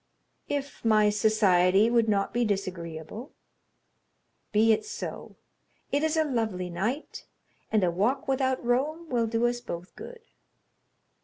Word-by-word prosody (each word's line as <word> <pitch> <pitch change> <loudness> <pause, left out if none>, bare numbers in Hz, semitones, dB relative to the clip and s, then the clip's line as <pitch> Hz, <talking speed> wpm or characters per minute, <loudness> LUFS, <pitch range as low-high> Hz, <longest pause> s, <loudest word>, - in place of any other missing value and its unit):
"If 285 -1 -4
my 215 -2 +4
society 205 -2 +4
would 230 -2 +3
not 200 -1 0
be 240 - +1
disagreeable." 185 - -4 1.2
"Be 220 +1 +4
it - - -1
so. 430 - -7 0.6
It 285 - +1
is 315 +1 0
a 315 - +4
lovely 220 - -2
night, 220 - -4 0.4
and 215 -3 +2
a 175 - +2
walk 215 +10 0
without 260 -2 0
Rome 300 +7 0
will 235 -3 +1
do 230 +1 0
us 240 0 0
both 175 -6 -7
good." 485 -1 -10
225 Hz, 135 wpm, -27 LUFS, 195-260 Hz, 1.2 s, my